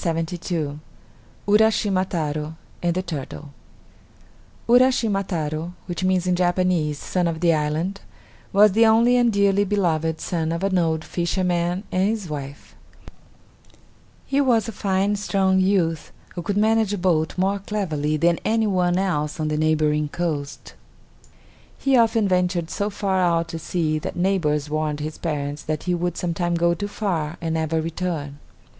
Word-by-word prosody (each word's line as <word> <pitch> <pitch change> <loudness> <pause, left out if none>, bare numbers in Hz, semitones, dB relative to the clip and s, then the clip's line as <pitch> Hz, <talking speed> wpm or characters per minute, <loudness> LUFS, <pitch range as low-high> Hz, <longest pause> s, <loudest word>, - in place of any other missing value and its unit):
URASCHIMA 205 -2 +3
TARO 155 -2 -3 0.3
AND 175 -1 0
THE 185 - -1
TURTLE 145 -3 -7 1.1
Uraschima 235 -5 +3
Taro, 160 -1 -3
which 175 +1 -4
means 185 -1 +2
in 180 -1 +2
Japanese 175 -4 +1
"Son 180 +3 -1
of 165 -1 -2
the 170 -1 +3
Island," 155 +6 -1 0.5
was 205 +1 +6
the 225 +3 +5
only 230 +3 +5
and 240 -1 +3
dearly 200 -1 +3
beloved 165 -6 0
son 165 -2 -2
of 170 +3 -3
an 190 -2 +2
old 160 -2 0
fisherman 175 +1 -1
and 185 +2 +2
his 215 -4 -3
wife: 145 -2 -7 1.5
He 275 +1 +1
was 235 -6 +2
a - - -3
fine, 200 0 0
strong 195 -2 +1
youth, 185 -5 +1 0.2
who 175 - -5
could 200 +4 -2
manage 220 -1 +2
a - - -1
boat 170 -3 0
more 195 +2 +1
cleverly 160 -8 -2
than 170 +2 +2
any 225 0 +1
one 180 -3 +1
else 160 -6 -1
on 155 -1 -1
the 155 - -1
neighboring 155 -1 +1
coast. 150 -4 -4 1.0
He 275 -1 +2
often 225 -3 +3
ventured 180 -2 0
so 205 +1 -1
far 195 -2 -1
out 170 -2 +1
to 165 - -5
sea 155 -2 -1
that - - -5
neighbors 170 -5 0
warned 155 0 -2
his 155 +1 -5
parents 145 -2 -3
that 155 -1 -3
he 180 - 0
would 175 0 -2
sometime 175 0 -1
go 170 0 +2
too 205 +4 -4
far 175 -6 -2
and 165 -1 -2
never 160 0 0
return. 160 -3 -4
175 Hz, 150 wpm, -23 LUFS, 160-195 Hz, 1.5 s, was